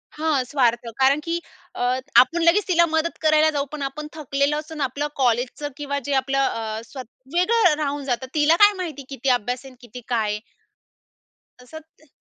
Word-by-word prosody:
हां, 305 -4 0
स्वार्थ. 240 -3 +1
कारण 270 +2 +4
की 335 +1 -2 0.4
अ, - - -5 0.4
आपण 335 +7 +5
लगेच 365 +5 +3
तिला 340 -2 +4
मदत 320 +1 -1
करायला 310 0 +4
जाऊ. 285 -2 -1
पण 300 -1 -6
आपण 300 +3 -5
थकलेलं 285 -1 -1
असून 310 -1 -8
आपलं 280 +3 -1
कॉलेजचं 250 +3 0
किंवा 285 -1 -3
जे 285 - -1
आपलं 275 +1 -2
अ, 225 -4 -1
स्व 265 +4 -11 0.4
वेगळं 365 0 +4
राहून 285 0 -3
जातं. 260 0 -2
तिला 310 +1 +4
काय 415 0 +7
माहिती, 315 -7 -5
किती 270 -1 -2
अभ्यास 245 +2 0
आहे 265 - -11
अन - - -20
किती 240 +1 -11
काय 220 -4 0
आहे. 210 - -4 1.2
असं 315 +6 -10 0.2
ते 310 - -24
285 Hz, 180 wpm, -22 LUFS, 255-315 Hz, 1.2 s, काय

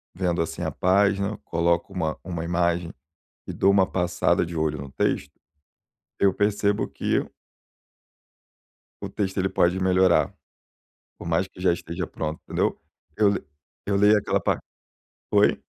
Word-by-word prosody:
vendo, 90 -2 0
assim, 80 - -4
a - - -1
página, 100 +2 +2
coloco 85 +1 0
uma 80 -4 -2
uma 85 -2 -4
imagem 85 0 0 0.5
e - - -5
dou 100 - +3
uma 95 -2 +4
passada 90 -1 +1
de 85 0 -7
olho 75 -1 0
no 70 -1 -8
texto, 70 +1 -1 0.9
eu 100 -1 +4
percebo 100 0 +1
que - - -1 1.8
o - - -4
texto, 95 -1 -2
ele 95 +1 +1
pode 90 0 +2
melhorar, 95 0 +3 0.9
por - - -7
mais 85 +3 +1
que 90 - -14
já 90 -2 +4
esteja 85 0 -4
pronto, 80 0 -5
entendeu. - - 0 0.4
Eu 105 -1 +4
le 100 - -2 0.4
eu 100 - +1
leio 105 +1 +5
aquela 105 - 0
pa - - 0 0.7
Oi? - - +3
90 Hz, 145 wpm, -25 LUFS, 85-100 Hz, 1.8 s, leio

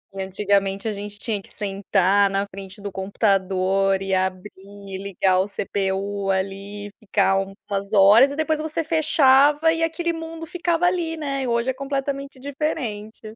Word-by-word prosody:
Antigamente, 195 +1 0
a - - 0
gente 205 0 -6
tinha 210 -1 -3
que - - -16
sentar 200 -1 +1
na 195 +1 0
frente 195 +1 -10
do 200 0 -6
computador 195 -1 +1
e 195 0 -3
abrir 185 +1 -1
e 200 -1 -10
ligar 190 -1 +1
o 190 - +2
CPU 195 0 -2
ali, 195 +2 -3
ficar 195 -2 +2
umas 195 +1 -5
horas, 205 +7 +7
e 285 - -5
depois 315 0 0
você 315 +1 -2
fechava, 295 -1 +4
e 330 - -3
aquele 335 +1 -1
mundo 325 0 -7
ficava 345 0 0
ali, 345 -3 0
né. 275 -3 -3
E 255 - -2
hoje 235 +2 +1
é - - -7
completamente 275 0 -4
diferente. 255 -6 -4
205 Hz, 155 wpm, -23 LUFS, 195-280 Hz, -, horas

